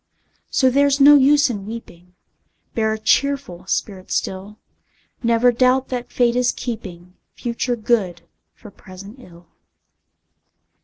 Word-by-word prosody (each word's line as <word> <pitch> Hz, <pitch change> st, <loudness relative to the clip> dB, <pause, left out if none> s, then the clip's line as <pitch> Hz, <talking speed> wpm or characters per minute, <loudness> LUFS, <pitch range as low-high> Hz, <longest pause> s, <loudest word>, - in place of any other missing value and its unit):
So 260 Hz, -2 st, +2 dB
there's 280 Hz, +1 st, +2 dB
no 285 Hz, +1 st, +8 dB
use 290 Hz, +1 st, +4 dB
in 200 Hz, -3 st, -7 dB
weeping, 180 Hz, -6 st, -11 dB, 0.6 s
Bear 220 Hz, -1 st, 0 dB
a -, -, -4 dB
cheerful 220 Hz, -6 st, -1 dB
spirit 190 Hz, -1 st, -4 dB
still; 195 Hz, +3 st, -4 dB, 0.6 s
Never 235 Hz, +1 st, +3 dB
doubt 255 Hz, +2 st, +1 dB
that 245 Hz, -1 st, -5 dB
Fate 240 Hz, -1 st, +1 dB
is 250 Hz, 0 st, +2 dB
keeping 185 Hz, -7 st, -8 dB, 0.2 s
Future 240 Hz, +1 st, -3 dB
good 210 Hz, -7 st, -1 dB, 0.3 s
for 210 Hz, -, -14 dB
present 195 Hz, +4 st, -13 dB
ill! 175 Hz, -6 st, -16 dB
230 Hz, 120 wpm, -20 LUFS, 190-255 Hz, 0.6 s, no